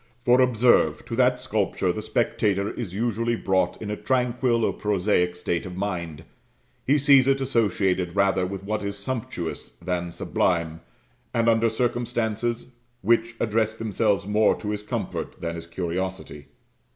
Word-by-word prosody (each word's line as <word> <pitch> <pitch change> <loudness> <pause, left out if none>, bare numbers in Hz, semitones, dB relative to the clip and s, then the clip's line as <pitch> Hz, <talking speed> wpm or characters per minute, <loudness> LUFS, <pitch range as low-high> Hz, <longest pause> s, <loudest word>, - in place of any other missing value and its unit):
For 125 +1 +5
observe, 120 -11 +3
to 115 - -4
that 125 0 +3
sculpture 105 -7 0
the 110 - -4
spectator 105 -3 0
is 95 -5 -6
usually 115 +1 0
brought 95 -4 0
in 105 -1 -5
a - - -1
tranquil 125 -1 +1
or - - 0
prosaic 95 -3 +1
state 85 -1 -2
of 90 -1 -7
mind; 85 -6 -4 0.6
he 140 +3 +4
sees 140 -2 +5
it 135 0 +3
associated 95 -8 0
rather 100 -2 +2
with 95 0 -6
what 105 +2 -2
is 100 0 -4
sumptuous 100 -6 -5
than 90 0 -3
sublime, 85 -2 -1 0.5
and 115 0 +2
under 115 0 +4
circumstances 120 0 -2 0.3
which 115 0 +2
address 110 0 +1
themselves 105 -4 0
more 105 +1 +3
to 105 - -4
his 105 0 -3
comfort 105 - -4
than 85 0 -3
his 85 0 -8
curiosity. 90 -3 -4
105 Hz, 150 wpm, -25 LUFS, 90-120 Hz, 0.6 s, For